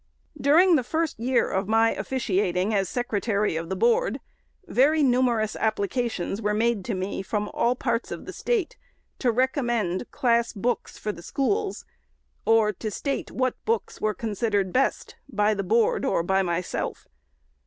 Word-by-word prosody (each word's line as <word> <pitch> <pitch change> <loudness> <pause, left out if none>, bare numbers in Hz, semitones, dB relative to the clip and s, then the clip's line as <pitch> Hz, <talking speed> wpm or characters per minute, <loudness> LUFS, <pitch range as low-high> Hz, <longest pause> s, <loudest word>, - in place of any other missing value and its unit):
During 315 +5 +5
the 255 - 0
first 315 +1 -2
year 245 +2 +1
of 190 +1 -1
my 225 +1 +3
officiating 195 -5 0
as 195 -3 +1
Secretary 210 -5 -1
of 165 +1 -4
the 190 - -1
Board, 475 +1 +2 0.5
very 305 0 +3
numerous 245 -4 +2
applications 220 -1 -1
were 210 0 0
made 225 -2 +1
to 225 - -2
me. 185 +1 -3
from 210 +1 -2
almost - - -14
all 240 +1 +2
parts 235 -2 -1
of - - -6
the - - -7
State, 455 -8 -1 0.4
to 245 - +2
recommend 240 - 0
class 235 -1 +1
books 240 +3 -2
for 215 - -3
the 170 - -11
schools, 390 - -1 0.6
or 225 -2 +4
to 215 +3 -5
state 275 +7 -3
what 255 -1 -2
books 460 +1 -2
were 215 -1 0
consid 220 +1 -2
ered 190 -2 +1
best 270 +1 0
by 210 -3 +2
the 200 -1 -2
Board, 225 +4 +2
or 170 - +1
by 190 +2 +2
myself. 175 -1 -3
225 Hz, 165 wpm, -25 LUFS, 200-255 Hz, 0.6 s, During